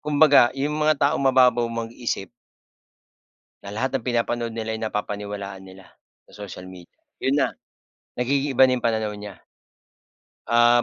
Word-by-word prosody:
kumbaga 145 -4 +5
yung 145 +2 -1
mga 155 0 +2
taong 140 - +2
mababaw 125 -3 +4
mag-isip 115 -2 -4 1.3
na 100 - -9
lahat 130 +5 -1
ng 115 - -18
pinapanood 120 -1 -1
nila 110 -1 -3
ay 110 - -4
napapaniwalaan 100 -2 -4
nila 95 0 -14 0.4
sa - - -22
social 90 0 -9
media. 90 -2 -14 0.2
Yun 135 +2 +1
na, - - +2 0.7
nag-iiba 135 +1 +3
yung 125 -1 0
pananaw 110 -2 0
niya. 105 -2 -9 1.1
Ah, 120 +1 +5
120 Hz, 135 wpm, -23 LUFS, 105-130 Hz, 1.3 s, kumbaga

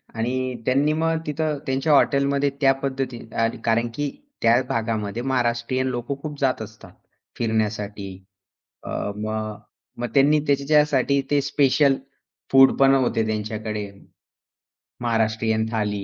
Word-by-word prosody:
आणि 115 +2 -1 0.3
त्यांनी 140 +4 +2
मग 165 0 +1
तिथं 150 0 -1
त्यांच्या 135 +4 +1
हॉटेलमध्ये 140 0 +3
त्या 135 0 +5
पद्धती 130 -2 -2 0.5
कारण, 115 +1 +2
की 145 -1 -1 0.3
त्या 115 +2 +4
भागामध्ये 110 -1 -2
महाराष्ट्रीयन 125 0 0
लोक 120 -2 -3
खूप 150 -2 -6
जात 130 -4 +1
असतात 110 0 -11 0.4
फिरण्यासाठी. 105 -3 -2 0.8
अ, - - -7 0.3
मग 110 0 -3 0.4
मग 120 0 -2
त्यांनी 145 +2 +5
त्यांच्यासाठी 140 -1 +2
ते 145 -1 +3
स्पेशल 140 0 +3 0.6
फूड 135 0 +7
पण 135 0 +6
होते 120 -4 +1
त्यांच्याकडे. 105 -1 -3 1.1
महाराष्ट्रीयन 110 -1 0
थाली. 105 -3 -1
125 Hz, 115 wpm, -23 LUFS, 110-140 Hz, 1.1 s, फूड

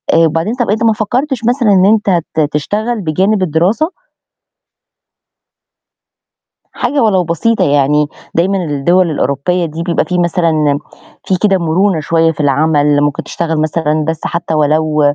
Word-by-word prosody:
وبعدين 165 +5 +1
طب 245 -2 -2
أنت 220 +3 0
ما 225 -1 +3
فكرتش 240 +4 -2
مثلًا 240 -3 +2
إن 190 -1 +4
أنت 205 -4 +2
ت 160 - -2
تشتغل 215 +9 -2
بجانب 190 +5 0
الدراسة؟ 185 - 0 2.8
حاجة 275 +4 -1
ولو 190 -4 +2
بسيطة 175 +7 0
يعني 145 +1 +2 0.3
دايمًا 190 +4 +1
الدول 165 +5 +1
الأوروبية 155 +5 -1
دي 165 +1 -5
بيبقى 170 -1 0
في 180 -1 -2
مثلًا، 160 -4 +1 0.5
في 190 - 0
كده 195 -1 +2
مرونة 170 +1 +1
شوية 165 +1 +1
في 160 - -13
العمل 145 0 +2
ممكن 145 -1 -1
تشتغل 165 -1 -3
مثلًا 155 -1 -1
بس 160 -1 -2
حتى 170 -1 -3
ولو 155 0 +1
170 Hz, 140 wpm, -13 LUFS, 155-200 Hz, 2.8 s, إن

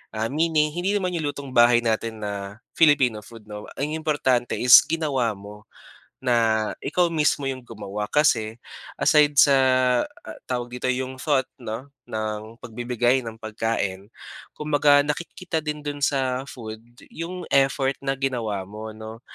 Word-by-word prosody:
ah, 110 +3 -2
meaning 155 0 +2
hindi 180 +5 -1
naman 185 -3 0
yung 160 -4 -2
lutong 140 -2 -8
bahay 120 -1 +5
natin 110 -1 -2
na 100 +1 -6
Filipino 140 -8 +3
food 115 +1 -14
'no. 105 0 -9
Ang 145 +2 -2
importante 130 -6 0
is 125 0 +9
ginawa 135 -9 0
mo, 105 +2 -12 0.5
na 115 -4 +1
ikaw 175 -2 +1
mismo 150 -2 +1
yung 130 -1 -3
gumawa 105 -3 -6
kasi 115 -7 +2 0.4
aside 150 -2 +4
sa, 140 0 +7 0.7
ah, - - -9
tawag 120 -1 -3
dito 125 +1 -2
yung 130 +1 -2
thought 135 -4 +1 0.2
'no 125 +5 -7 0.2
ng 110 +1 -4
pagbibigay 120 +1 0
ng 115 -1 -8
pagkain. 110 -3 -3 0.5
Kumbaga 145 -1 +3
nakikita 165 +2 -3
din 150 -1 -5
dun 145 0 -4
sa 130 -2 +1
food 110 -3 -8 0.3
yung 180 +2 -6
effort 135 0 +3
na 135 0 -2
ginawa 115 -8 -2
mo 105 +2 -8
no, 110 +1 -9
125 Hz, 145 wpm, -24 LUFS, 110-145 Hz, 0.7 s, is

